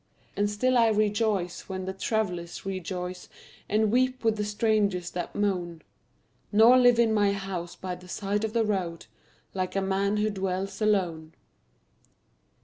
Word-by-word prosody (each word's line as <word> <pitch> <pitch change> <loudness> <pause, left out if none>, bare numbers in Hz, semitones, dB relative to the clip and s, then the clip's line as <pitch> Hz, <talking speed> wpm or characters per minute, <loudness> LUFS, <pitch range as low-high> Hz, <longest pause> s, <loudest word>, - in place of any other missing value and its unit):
And 205 0 +1
still 250 +4 +2
I 230 - +5
rejoice 210 -4 0
when 190 -1 -4
the 190 - -3
travelers 190 -5 -3
rejoice 180 -1 -5 0.4
And 215 0 +2
weep 255 +1 +1
with 225 -1 +2
the 210 - -2
strangers 205 -4 0
that 175 -1 -5
moan, 175 -6 -1 0.7
Nor 230 +5 +7
live 245 -1 +5
in 230 -2 +3
my 205 -2 +3
house 185 -3 -5
by 185 -1 -5
the 180 0 -11
side 205 +2 -2
of 220 -1 -2
the 230 -2 +2
road 180 -5 -2 0.5
Like 185 -1 -3
a - - +2
man 195 +2 0
who 215 +1 +1
dwells 190 +1 -3
alone. 175 -7 0
200 Hz, 150 wpm, -27 LUFS, 180-215 Hz, 0.7 s, Nor